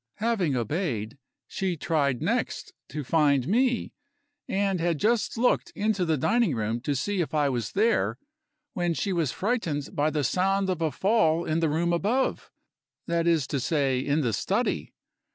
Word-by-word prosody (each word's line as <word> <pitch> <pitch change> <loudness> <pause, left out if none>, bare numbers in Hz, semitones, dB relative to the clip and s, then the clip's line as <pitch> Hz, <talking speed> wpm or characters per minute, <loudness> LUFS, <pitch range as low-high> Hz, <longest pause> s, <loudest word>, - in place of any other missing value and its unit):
Having 210 - 0
obeyed, 120 - -2 0.3
she 185 -3 -2
tried 145 -6 0
next - - -2 0.2
to 150 +1 -4
find 140 -2 +2
me, 245 +4 +1 0.5
and 195 -1 0
had 170 -1 0
just 225 +7 +1
looked 245 +2 +2
into 210 -3 0
the 160 -2 +1
dining 210 - +2
room 110 +1 -2
to 145 +3 -1
see 195 +8 -1
if 155 -2 -3
I 145 -2 +2
was 120 -5 -3
there, 220 +3 +2 0.6
when 175 -5 0
she 195 +3 -1
was 165 -6 0
frightened 180 - -2
by 145 +1 +2
the 150 -1 -1
sound 190 +6 +1
of 175 -3 -3
a 160 -2 +1
fall 175 -5 +2
in 160 +1 0
the 165 -2 +1
room 170 +3 +1
above 220 +10 0 0.6
that 170 0 0
is 165 -5 +3
to 140 - -1
say, 135 -1 +1
in 145 +4 0
the 120 -5 0
study. 200 - -1
165 Hz, 170 wpm, -27 LUFS, 145-195 Hz, 0.6 s, is